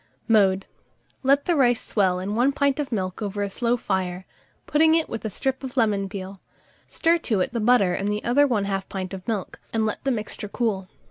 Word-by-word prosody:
Mode. 195 Hz, -4 st, +3 dB, 0.6 s
Let 275 Hz, +1 st, +3 dB
the 350 Hz, -, +2 dB
rice 245 Hz, -5 st, +3 dB
swell 190 Hz, -4 st, +2 dB
in 190 Hz, +3 st, -3 dB
1 250 Hz, +5 st, +2 dB
pint 280 Hz, 0 st, +1 dB
of 290 Hz, -, -2 dB
the 235 Hz, -, -1 dB
milk 185 Hz, 0 st, -3 dB
over 205 Hz, -1 st, -2 dB
a 200 Hz, -, -2 dB
slow 240 Hz, +3 st, 0 dB
fire, 190 Hz, -4 st, -2 dB, 0.4 s
putting 315 Hz, +1 st, +4 dB
with 225 Hz, -, -5 dB
it -, -, -7 dB
a -, -, -1 dB
strip 265 Hz, +6 st, -2 dB
of 265 Hz, 0 st, -7 dB
lemon 205 Hz, -4 st, +2 dB
peel; 195 Hz, -1 st, -7 dB, 0.5 s
stir 335 Hz, +1 st, +2 dB
to 220 Hz, -10 st, 0 dB
it 185 Hz, -, -1 dB
the 235 Hz, -, -1 dB
butter 215 Hz, -5 st, +4 dB
and 200 Hz, +3 st, -1 dB
the 210 Hz, 0 st, -2 dB
other 280 Hz, +5 st, +4 dB
1/2 200 Hz, -5 st, -1 dB
pint 190 Hz, -1 st, -5 dB
of 185 Hz, -1 st, -8 dB
milk, 215 Hz, -5 st, -3 dB
and 220 Hz, -1 st, +1 dB
let 215 Hz, -, -3 dB
the 275 Hz, -, 0 dB
mixture 215 Hz, -3 st, -3 dB
cool. 200 Hz, -5 st, -2 dB
215 Hz, 215 wpm, -24 LUFS, 195-250 Hz, 0.6 s, putting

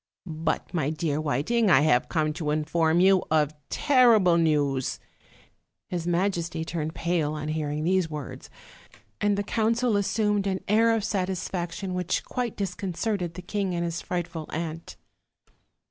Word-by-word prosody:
"But, 160 Hz, +1 st, -3 dB
my 155 Hz, -5 st, 0 dB
dear 155 Hz, -1 st, -1 dB
Whiting, 155 Hz, -, +1 dB
I 135 Hz, -5 st, +6 dB
have 145 Hz, -5 st, +3 dB
come 155 Hz, -2 st, 0 dB
to 155 Hz, -2 st, -3 dB
inform 160 Hz, +2 st, +1 dB
you 190 Hz, 0 st, +5 dB
of 155 Hz, -1 st, +2 dB, 0.2 s
terrible 235 Hz, -, +4 dB
news. 145 Hz, -5 st, +1 dB, 0.4 s
" -, -, -39 dB
His 175 Hz, -2 st, -3 dB
majesty 170 Hz, -2 st, -1 dB
turned 160 Hz, -1 st, -4 dB
pale 160 Hz, 0 st, 0 dB
on 150 Hz, 0 st, -4 dB
hearing 155 Hz, -1 st, -2 dB
these 180 Hz, 0 st, +1 dB
words, 150 Hz, -4 st, -7 dB, 0.7 s
and 205 Hz, -1 st, +2 dB
the 205 Hz, -, 0 dB
council 230 Hz, +2 st, +1 dB
assumed 205 Hz, 0 st, +1 dB
an 190 Hz, -1 st, -2 dB
air 225 Hz, +2 st, +4 dB
of 220 Hz, -, -1 dB
satisfac 185 Hz, -3 st, -2 dB
tion 190 Hz, -2 st, -5 dB
which 180 Hz, -1 st, -1 dB
quite 245 Hz, -3 st, -3 dB
disconcerted 190 Hz, -1 st, -2 dB
the 180 Hz, -, -8 dB
king 195 Hz, -1 st, -2 dB
and 170 Hz, 0 st, -1 dB
his 170 Hz, 0 st, -3 dB
frightful 170 Hz, -3 st, -4 dB
aunt. 165 Hz, 0 st, -5 dB
175 Hz, 150 wpm, -26 LUFS, 155-195 Hz, 0.7 s, I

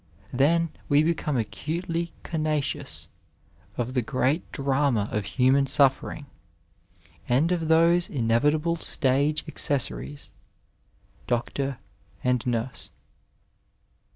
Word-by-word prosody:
Then, 165 Hz, +6 st, +3 dB, 0.2 s
we 145 Hz, +1 st, +5 dB
become 155 Hz, -3 st, 0 dB
acutely 165 Hz, -, -3 dB
conscious 155 Hz, -3 st, -2 dB, 0.7 s
of 125 Hz, +1 st, -2 dB
the 125 Hz, -, +2 dB
great 130 Hz, +7 st, -1 dB
drama 135 Hz, -6 st, +1 dB
of 105 Hz, -2 st, -1 dB
human 135 Hz, +2 st, +3 dB
suffering, 140 Hz, +2 st, +2 dB, 1.0 s
and 140 Hz, +8 st, +3 dB
of 165 Hz, -3 st, 0 dB
those 170 Hz, +2 st, +4 dB
inevitable 145 Hz, +7 st, +1 dB
stage 145 Hz, +1 st, 0 dB
accessories 140 Hz, +1 st, -1 dB, 1.0 s
Hloctor 130 Hz, +2 st, -1 dB, 0.5 s
and 125 Hz, -2 st, +1 dB
nurse. 120 Hz, +1 st, -2 dB
140 Hz, 90 wpm, -26 LUFS, 125-160 Hz, 1.0 s, we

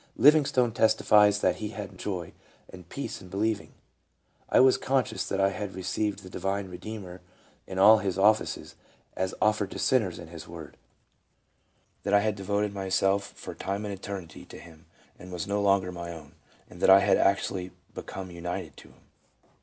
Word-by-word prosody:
Livingstone 135 Hz, -3 st, +5 dB
testifies 105 Hz, -2 st, +4 dB
that -, -, +2 dB
he 110 Hz, -, -4 dB
had 100 Hz, -3 st, -8 dB
joy 90 Hz, -5 st, -4 dB, 0.4 s
and 90 Hz, -1 st, -12 dB
peace 140 Hz, -, -5 dB
in 90 Hz, -, -12 dB
believing: 105 Hz, +2 st, -1 dB, 0.4 s
" -, -, -47 dB, 0.3 s
I -, -, +4 dB
was 130 Hz, 0 st, +6 dB
conscious 130 Hz, -3 st, -1 dB
that 95 Hz, -, -1 dB
I 95 Hz, 0 st, +4 dB
had 100 Hz, 0 st, -5 dB
received 100 Hz, +2 st, -2 dB
the -, -, -10 dB
divine 95 Hz, +1 st, -2 dB
Redeemer 90 Hz, 0 st, -8 dB, 0.5 s
in 95 Hz, -, -6 dB
all 105 Hz, +3 st, +7 dB
Hisoffices, 105 Hz, +2 st, +1 dB, 0.4 s
as 95 Hz, 0 st, -2 dB
offered 105 Hz, -2 st, +2 dB
to -, -, -7 dB
sinners 110 Hz, -10 st, +1 dB
in 85 Hz, -2 st, -10 dB
His 80 Hz, -2 st, -10 dB
Word; 85 Hz, -3 st, -10 dB, 1.3 s
that 100 Hz, -, +1 dB
I 100 Hz, -, +5 dB
had 105 Hz, 0 st, 0 dB
devoted 100 Hz, +1 st, -1 dB
myself, 95 Hz, 0 st, +1 dB
for -, -, -8 dB
time 100 Hz, +2 st, -4 dB
and 100 Hz, -, -4 dB
eternity, 95 Hz, -4 st, -7 dB
to -, -, -12 dB
Him, 80 Hz, -1 st, -15 dB, 0.3 s
and 90 Hz, +1 st, -11 dB
was 90 Hz, +1 st, -4 dB
no 100 Hz, +1 st, -1 dB
longer 95 Hz, -2 st, +2 dB
my 85 Hz, -1 st, -6 dB
own; 80 Hz, -4 st, -11 dB, 0.3 s
and 90 Hz, -, -14 dB
that -, -, +4 dB
I 95 Hz, +1 st, +9 dB
had -, -, +4 dB
actually 95 Hz, -1 st, +1 dB, 0.2 s
become 95 Hz, -1 st, -7 dB
united 85 Hz, 0 st, -5 dB
to -, -, -13 dB
Him. -, -, -22 dB
100 Hz, 175 wpm, -28 LUFS, 90-105 Hz, 1.3 s, I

